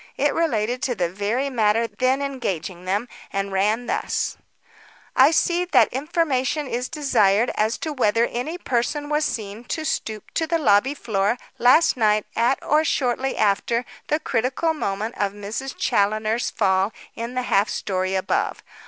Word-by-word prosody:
It - - +2
related 245 -6 0
to 245 - -1
the 175 -4 -1
very 210 +8 -1
matter 225 -1 +2
then 260 +4 0
engaging 190 - -4
them, 200 +6 -1 0.2
and 195 0 -2
ran 210 +5 +1
thus: - - -1 0.8
"I 265 +2 +7
see 345 +2 +2
that 360 - +3
information 295 0 0
is 250 -1 -3
desired 240 -8 +2
as 220 +2 0
to 315 - -4
whether 230 -3 +2
any 250 +9 -4
person 290 0 -1
was 300 0 +1
seen 215 0 -4
to 315 +5 -3
stoop 220 -7 -3
to 320 - 0
the 335 +1 +1
lobby 260 -1 +3
floor 215 -3 0 0.2
last 255 +7 +5
night 215 -2 +2
at 240 +4 +2
or 305 +2 +3
shortly 265 -3 0
after 230 +4 +1 0.2
the 300 - +1
critical 260 +4 0
moment 215 -5 -3
of 200 -1 0
Miss 210 +6 -5
Challoner's 215 +3 +1
fall 190 +2 +1 0.2
in 235 +2 -6
the 255 - 0
half 205 -3 +2
story 185 -1 -2
above. 190 0 -1
235 Hz, 155 wpm, -23 LUFS, 205-275 Hz, 0.8 s, I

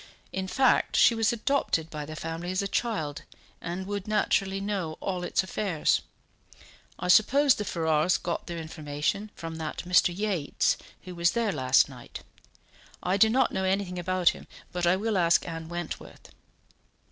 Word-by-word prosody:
In 190 0 -3
fact, 260 +6 +2
she - - +6
was 225 -1 +2
adopted 230 - 0
by 150 -2 -5
the 155 - -7
family 165 +2 -5
as 185 +2 0
a - - -1
child, 190 -11 -2 0.4
and 180 +2 -4
would 200 0 -4
naturally 195 -2 +1
know 195 -6 -3
all 185 -2 -3
its 175 - +1
affairs. 190 -4 0 1.0
I - - -4
suppose 270 +9 +5
the 210 - -4
Ferrars 160 -1 +1
got 170 - -4
their 170 - -5
information 155 +5 -3
from 165 -1 -6
that 155 -1 -5
Mr. 180 0 +4
Yates 185 -5 0 0.3
who 185 - -8
was 170 0 +2
there 230 -3 +1
last 130 -4 +3
night; 125 -4 -11 0.8
I 180 +2 +1
do 220 +2 +5
not 255 +4 +2
know 190 - -2
anything 190 -1 -1
about 180 0 +2
him, - - -7 0.2
but 175 -1 -1
I 175 - +5
will 210 0 0
ask 170 0 +3
Anne 165 -1 -6
Wentworth." 175 -1 -7
180 Hz, 165 wpm, -27 LUFS, 165-200 Hz, 1.0 s, she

